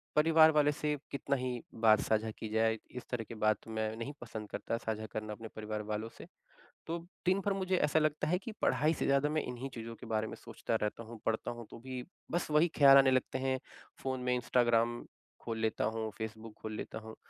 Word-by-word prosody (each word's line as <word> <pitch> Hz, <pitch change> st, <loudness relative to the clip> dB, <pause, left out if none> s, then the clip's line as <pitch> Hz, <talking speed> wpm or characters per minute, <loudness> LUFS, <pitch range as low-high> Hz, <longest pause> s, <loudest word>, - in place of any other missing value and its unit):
परिवार 160 Hz, +1 st, +7 dB
वालों 150 Hz, -1 st, +4 dB
से 150 Hz, 0 st, -1 dB
कितना 140 Hz, 0 st, 0 dB
ही 125 Hz, -2 st, -2 dB
बात 110 Hz, -2 st, +5 dB
साझा 110 Hz, 0 st, +1 dB
की 110 Hz, -, -5 dB
जाए, 110 Hz, 0 st, +3 dB
इस 125 Hz, -, -6 dB
तरह 120 Hz, -2 st, -1 dB
की 115 Hz, +1 st, -9 dB
बात 110 Hz, 0 st, +2 dB
मैं 110 Hz, 0 st, -2 dB
नहीं 120 Hz, +5 st, -4 dB
पसंद 110 Hz, -3 st, -6 dB
करता 115 Hz, -, -2 dB
साझा 110 Hz, -1 st, -3 dB
करना 110 Hz, 0 st, -3 dB
अपने 115 Hz, +1 st, -8 dB
परिवार 105 Hz, 0 st, -3 dB
वालों 110 Hz, +2 st, -2 dB
से। -, -, -9 dB, 0.6 s
तो 165 Hz, -, -1 dB, 0.3 s
दिन 185 Hz, +2 st, +4 dB
भर 200 Hz, -, +2 dB
मुझे 190 Hz, -1 st, 0 dB
ऐसा 155 Hz, -1 st, +3 dB
लगता 155 Hz, -1 st, +1 dB
है 180 Hz, +3 st, +2 dB
कि 230 Hz, -, -6 dB
पढ़ाई 155 Hz, +2 st, +3 dB
से -, -, -2 dB
ज़्यादा, 140 Hz, +1 st, +3 dB
मैं 155 Hz, 0 st, +1 dB
इन्हीं 125 Hz, +2 st, -5 dB
चीज़ों 115 Hz, -1 st, -6 dB
के -, -, -11 dB
बारे 110 Hz, -1 st, 0 dB
में -, -, -6 dB
सोचता -, -, -4 dB
रहता 105 Hz, +2 st, -2 dB
हूँ, 115 Hz, 0 st, -10 dB
पढ़ता 115 Hz, +1 st, 0 dB
हूँ 120 Hz, -1 st, -7 dB
तो -, -, -9 dB
भी 130 Hz, +1 st, -5 dB, 0.3 s
बस 175 Hz, -1 st, 0 dB
वही 150 Hz, +3 st, +5 dB
ख़्याल 140 Hz, -2 st, +9 dB
आने 135 Hz, -1 st, +6 dB
लगते 130 Hz, 0 st, +1 dB
हैं, 130 Hz, 0 st, 0 dB, 0.4 s
फ़ोन 130 Hz, -1 st, -1 dB
में 125 Hz, 0 st, +2 dB
इंस्टाग्राम 120 Hz, -1 st, +2 dB, 0.4 s
खोल 115 Hz, -1 st, -3 dB
लेता 110 Hz, -1 st, +1 dB
हूँ, 110 Hz, 0 st, -1 dB
फ़ेसबुक 110 Hz, 0 st, -6 dB
खोल 110 Hz, -, -5 dB
लेता -, -, -5 dB
हूँ 110 Hz, -, -8 dB
120 Hz, 220 wpm, -33 LUFS, 110-145 Hz, 0.6 s, ख़्याल